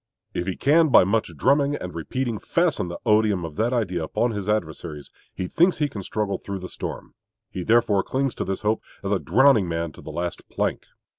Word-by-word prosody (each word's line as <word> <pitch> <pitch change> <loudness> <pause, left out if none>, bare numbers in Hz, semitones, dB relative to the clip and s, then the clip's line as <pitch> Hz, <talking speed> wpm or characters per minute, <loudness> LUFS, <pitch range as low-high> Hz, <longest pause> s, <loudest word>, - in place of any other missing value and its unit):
If 90 - -3
he 95 - -1
can 160 +3 +4
by - - +7
much 100 0 0
drumming 140 - +3
and 90 -9 -6
repeating 115 +7 -3
fasten 170 - 0
the 85 - -5
odium 105 -5 +3
of 80 -2 -8
that 115 +3 +1
idea 95 -9 -1
upon 120 +9 0
his 105 -2 -4
adversaries, 80 -7 -3 0.2
he 90 - -4
thinks 175 - +3
he 150 - +1
can 105 -8 -7
struggle 105 +1 -2
through 100 -1 -5
the 90 -1 -7
storm. - - -6 0.4
He 95 - -4
therefore 115 -1 +3
clings 135 +2 -1
to - - -3
this 95 0 -3
hope 110 +1 +1 0.2
as 100 - -2
a 100 - +2
drowning 110 - +4
man 85 0 -2
to - - -14
the - - -9
last 85 +3 -4
plank. - - -2
105 Hz, 210 wpm, -24 LUFS, 90-120 Hz, 0.4 s, by